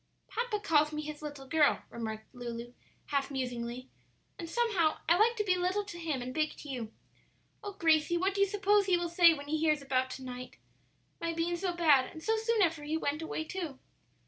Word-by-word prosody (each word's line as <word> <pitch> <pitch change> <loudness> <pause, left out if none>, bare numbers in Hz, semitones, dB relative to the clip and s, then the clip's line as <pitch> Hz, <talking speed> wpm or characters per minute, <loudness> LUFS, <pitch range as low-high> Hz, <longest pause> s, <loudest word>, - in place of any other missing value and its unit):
"Papa 470 -2 -2
calls 305 -6 +3
me 305 0 -4
his 300 0 -7
little 290 -3 -7
girl," 300 0 +3
remarked 220 -1 -6
Lulu, 240 -1 -6 0.4
half 280 -1 0
musingly; 250 -2 -4 0.5
"and 335 - -6
somehow 405 -8 +2
I 335 - +6
like 445 +5 +4
to 425 - 0
be 370 -3 +2
little 365 +3 0
to 400 -4 -9
him 305 -7 -2
and 255 +1 -5
big 310 +1 0
to 295 - -10
you. 240 -5 -4 0.7
Oh, 410 -1 -5
Gracie, 325 -2 +3
what 380 +3 +1
do 400 - 0
you 395 - +5
suppose 405 0 +2
he 365 -2 +4
will 345 0 -2
say 340 0 +7
when 285 -1 -9
he 310 +1 0
hears 305 -2 +2
about 260 -1 0
to 265 - -11
night? 250 0 -8 0.6
my 335 0 -2
being 335 +1 0
so 360 +1 -1
bad; 295 -7 +4
and 315 - -10
so 445 - +2
soon 445 -1 +2
after 325 -4 0
he 305 +2 -1
went 300 0 -2
away, 320 0 -3
too." 325 -5 -5
315 Hz, 210 wpm, -31 LUFS, 275-370 Hz, 0.7 s, say